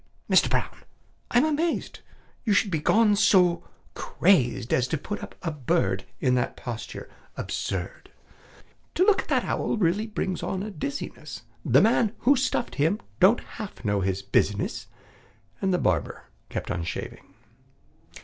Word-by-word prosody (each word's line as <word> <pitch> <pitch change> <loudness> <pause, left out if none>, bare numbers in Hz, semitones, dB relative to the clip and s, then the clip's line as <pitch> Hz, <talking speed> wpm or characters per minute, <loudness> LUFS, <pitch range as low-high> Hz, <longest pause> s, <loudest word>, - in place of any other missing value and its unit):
Mister - - +4
Brown, - - -1 0.5
I'm 245 +4 +4
amazed 315 +2 -1 0.4
You 220 - +2
should 200 0 +2
be 160 - 0
so - - -20
gone 200 -5 +4 0.2
crazed 125 - +1
As 125 0 +2
to 160 - -1
put 205 +8 -5
up - - -9
a 165 - -1
bird 100 -9 0
In 125 - +2
that 125 -1 0
posture 115 -2 -6 0.3
absurd! - - -4 0.9
To 365 - +4
look 400 -2 +4
at - - -15
that - - +1
owl - - -1
really 200 +3 +1
brings 190 -4 -3
on 190 0 -3
a 215 - -5
dizziness; 145 - -6 0.2
The 130 +4 +5
man 225 0 +3
who 280 +3 +5
stuffed 255 -2 -1
him 165 +8 +2 0.2
don't 195 +6 +5
half 210 - -9
know 100 -1 +1
his 95 +1 -1
business!" 100 +1 0 0.7
And 190 - +1
the 180 - +3
barber 85 - -1 0.3
kept - - -4
on 85 - -2
shaving. 85 - -7
180 Hz, 150 wpm, -26 LUFS, -, 0.9 s, The